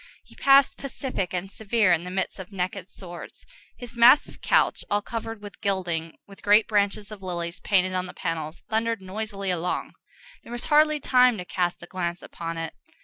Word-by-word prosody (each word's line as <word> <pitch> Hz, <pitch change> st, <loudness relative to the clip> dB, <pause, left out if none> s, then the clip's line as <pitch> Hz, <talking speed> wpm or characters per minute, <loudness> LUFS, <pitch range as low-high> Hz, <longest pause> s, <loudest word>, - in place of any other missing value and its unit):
He -, -, -19 dB
passed, 275 Hz, 0 st, +5 dB
pacific 260 Hz, -9 st, -3 dB
and 185 Hz, +2 st, -4 dB
severe, 210 Hz, -2 st, +2 dB
in 170 Hz, +1 st, 0 dB
the -, -, -5 dB
midst 190 Hz, +1 st, -2 dB
of 190 Hz, +1 st, -8 dB
naked 190 Hz, 0 st, -3 dB
swords. 175 Hz, -4 st, -10 dB, 0.3 s
His 245 Hz, -1 st, -9 dB
massive 235 Hz, +5 st, +5 dB
couch, -, -, +2 dB
all 205 Hz, 0 st, +1 dB
covered 225 Hz, -1 st, -5 dB
with 205 Hz, -1 st, -10 dB
gilding, 175 Hz, -5 st, -2 dB
with 200 Hz, -1 st, -15 dB
great 210 Hz, +2 st, +5 dB
branches 205 Hz, 0 st, 0 dB
of 210 Hz, -2 st, -9 dB
lilies 170 Hz, -2 st, -4 dB
painted 185 Hz, -2 st, +2 dB
on 185 Hz, 0 st, -1 dB
the 180 Hz, -, -10 dB
panels, 160 Hz, -1 st, -4 dB
thundered 225 Hz, 0 st, 0 dB
noisily 200 Hz, 0 st, -4 dB
along. 180 Hz, 0 st, -2 dB, 0.5 s
There -, -, -13 dB
was 240 Hz, 0 st, -5 dB
hardly 305 Hz, 0 st, +5 dB
time 250 Hz, -3 st, +4 dB
to 180 Hz, -, -6 dB
cast 175 Hz, -1 st, -1 dB
a -, -, -7 dB
glance 175 Hz, -1 st, -4 dB
upon 165 Hz, 0 st, -6 dB
it. 165 Hz, 0 st, -4 dB
195 Hz, 185 wpm, -26 LUFS, 180-225 Hz, 0.5 s, passed